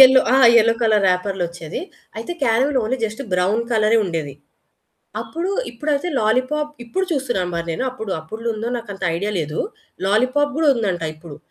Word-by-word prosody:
Yellow 260 0 +9 0.2
ఆ! - - +5 0.2
Yellow 230 0 +5
colour 215 -3 +3
రాపర్లోచ్చేది. 180 -3 -2 0.4
అయితే 350 - -4
caramel 260 +3 +3
only 255 +4 -1
just 220 +4 -4
brown 185 +5 +2
కలరే 220 0 +4
ఉండేది. 160 -6 -3 0.9
అప్పుడు 345 +4 -3 0.2
ఇప్పుడైతే 290 +6 -1
లాలీపాప్ 255 +7 +1
ఇప్పుడు 375 +11 -1
చూస్తున్నా 260 - 0
మరి 170 0 -2
నేను 210 - -2
అప్పుడు 220 -5 -7
అప్పుడ్లో 225 +6 -4
నాకు 230 -3 -9
అంత 195 - -14
ఐడియా 205 +4 -2
లేదు. 155 0 -3 0.5
లాలీపాప్ 255 +8 +2
కూడా 320 -2 +3
ఉందంట 195 -8 -1
ఇప్పుడు 155 -2 -11
225 Hz, 150 wpm, -21 LUFS, 185-260 Hz, 0.9 s, Yellow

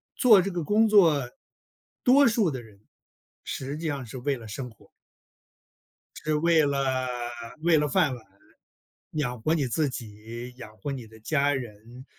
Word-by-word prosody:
做 220 -7 +6
这 195 - -3
个 175 -2 -3
工 215 +8 +3
作， 165 - +4 0.7
多 275 +3 +6
数 215 -7 +2
的 130 -3 -5
人 105 -4 -17 0.6
实 135 +2 -5
际 165 +1 -4
上 140 -4 -3
是 120 +3 -8
为 140 +2 -1
了 115 -2 -11
生 125 +5 -6
活。 110 - -21 1.3
是 155 0 0
为 160 +1 +4
了 135 -2 0 0.5
为 165 0 +4
了 150 0 +2
饭 140 0 +2
碗， 115 -3 -14 0.9
养 125 -6 -2
活 155 - +1
你 145 -5 +1
自 145 +4 0
己、 115 +1 -8
养 110 -4 -11
活 145 - -5
你 130 -4 -6
的 110 0 -16
家 145 +4 +1
人、 120 0 -8
140 Hz, 170 characters per minute, -26 LUFS, 120-160 Hz, 1.3 s, 做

